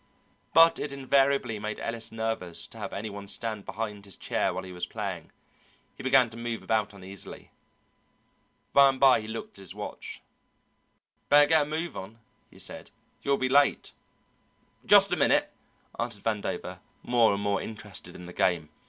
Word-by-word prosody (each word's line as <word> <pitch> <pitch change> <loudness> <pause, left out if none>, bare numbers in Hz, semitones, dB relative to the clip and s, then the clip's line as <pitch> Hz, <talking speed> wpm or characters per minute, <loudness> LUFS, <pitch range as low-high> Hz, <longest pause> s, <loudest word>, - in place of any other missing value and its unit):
But 165 0 +7
it 145 - -3
invariably 135 -4 +2
made 105 +1 -4
Ellis 115 -1 -3
nervous 110 -6 -3
to - - -12
have - - -5
any 105 +1 -5
one 100 0 -8
stand 110 0 -4
behind 105 -2 -5
his 100 - -10
chair - - 0
while - - -4
he 95 - -9
was 90 -1 -4
playing; 95 -7 -5 0.6
he - - -10
began 130 -3 +4
to 115 - -9
move 115 -1 -4
about 110 -3 0
uneasily. 95 0 -9 1.2
By 140 0 +8
and 135 -1 -2
by 130 -4 +6
he 110 - -9
looked 110 -2 -7
at - - -11
his 95 - -8
watch. - - -7 1.1
"Better 145 0 +7
get 160 -1 +5
a - - 0
move 160 +3 -3
on," 100 +4 -8 0.3
he - - -18
said, - - -5 0.3
"you'll 140 0 +1
be 130 - 0
late." 140 +2 +3 0.9
"Just - - +7
a - - +3
minute," - - +2 0.5
answered 115 -4 -3
Vandover, 110 -2 -3 0.2
more 120 -2 +4
and 100 - -4
more 100 -1 +1
interested 105 -3 -8
in 90 - -10
the 90 - -10
game. 85 -5 +1
110 Hz, 170 wpm, -28 LUFS, 100-130 Hz, 1.2 s, By